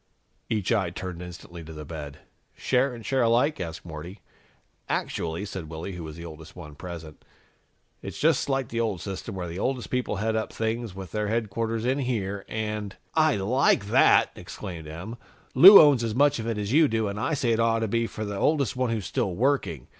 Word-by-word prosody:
Each 105 -3 -1
eye 100 -6 +2
turned 90 -1 -6
instantly 85 -1 -9
to 80 +1 -10
the 75 -1 -8
bed. 75 -2 -8 0.4
"Share 130 +1 +1
and 115 -2 -11
share 135 -1 +1
alike?" 120 +6 +2
asked 80 -2 -6
Morty. 85 +4 -8 0.7
"Actually," 85 +4 -2
said 95 -6 -7
Willy, 80 +4 -6
who 90 -1 -7
was 80 -1 -8
the 85 +1 -9
oldest 80 -1 -11
one 75 -1 -10
present, 80 -1 -9 0.8
"it's - - -7
just 155 -2 +2
like 135 -3 0
the 115 - -3
old 110 -6 -1
system, 95 +1 -6
where 90 -2 -4
the 85 +2 -6
oldest 130 0 -2
people 125 -4 -1
head 110 +2 -1
up 110 - -2
things 110 -2 -3
with 95 -3 -8
their 105 -1 -1
headquarters 115 +1 -2
in 130 +3 +1
here 100 -7 -2
and 105 -2 -3
" - - -44 0.2
"I 140 - +1
like 100 0 +2
that!" - - +5
exclaimed 85 -6 -8
Em. 90 +10 -7 0.4
"Lou 195 +4 +11
owns 140 -6 +6
as 110 -2 -2
much 140 -1 +3
of 115 - -4
it 115 -2 -1
as 105 +2 -2
you 155 +1 +6
do, 110 -3 0
and 100 +1 -4
I 160 +7 0
say 125 -4 0
it 115 - +1
ought 115 0 +2
to 110 - 0
be 115 +2 0
for 110 - -5
the 100 -1 -4
oldest 140 -7 +1
one 125 -1 0
who's 110 -4 -2
still 95 -1 -1
working. 100 - 0
105 Hz, 210 wpm, -26 LUFS, 90-120 Hz, 0.8 s, Lou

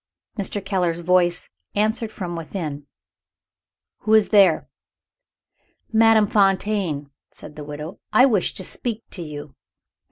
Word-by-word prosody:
Mr. 200 -1 -3
Keller's 180 -4 0
voice 175 0 +2 0.2
answered 220 +2 0
from 180 -5 -5
within, 155 -4 -5 1.1
"Who 220 +1 +3
is 215 -2 +4
there?" 195 -6 +5 1.3
"Madame 225 -1 +5
Fontaine," 195 -7 +1 0.2
said 150 - -11
the 150 - -7
widow. 150 +5 -7
"I 220 +5 +6
wish 215 -9 +1
to 190 - -3
speak 225 +3 -3
to 180 - -5
you." 145 -3 -8
190 Hz, 120 wpm, -22 LUFS, 165-215 Hz, 1.3 s, I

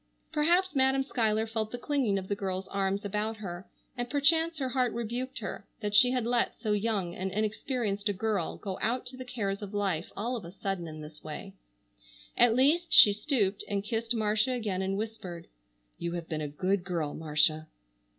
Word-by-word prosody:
Perhaps 340 +4 +2
Madam 265 0 +4
Schuyler 220 -4 +1
felt 220 -1 -2
the 245 - -5
clinging 250 -6 +1
of 190 -1 -4
the 205 - 0
girl's 190 -1 -3
arms 195 +1 -1
about 210 +2 -2
her, 185 -3 -7 0.3
and 245 -1 -3
perchance 320 +4 +3
her 265 -3 -1
heart 255 -2 +1
rebuked 240 +3 -3
her 205 -2 -5
that 210 -2 -3
she 245 +4 +7
had 250 -2 0
let 240 0 +1
so 215 - -2
young 205 -4 0
and 190 +1 -3
inexperienced 215 0 -1
a - - +1
girl 200 -2 -1
go 195 -2 -5
out 245 +3 0
to 255 +1 -7
the 255 - -7
cares 215 -6 -3
of 205 0 -6
life 190 -5 -1
all 235 +5 -1
of 230 - -5
a 170 - -8
sudden 195 -3 -3
in 155 -1 -8
this 150 0 -11
way. 155 +6 -7 0.8
At 240 -2 +5
least 315 +7 +3
she 205 - +9
stooped 210 -3 0
and 200 -1 -1
kissed 225 +2 -1
Marcia 215 +3 +2
again 210 -6 -1
and 190 +1 -1
whispered: 200 -6 -5 0.5
"You 170 0 -2
have 170 -1 -4
been 155 -1 -3
a 150 - -2
good 185 +6 0
girl, 170 -5 -2
Marcia." 155 0 +1
210 Hz, 195 wpm, -30 LUFS, 190-245 Hz, 0.8 s, she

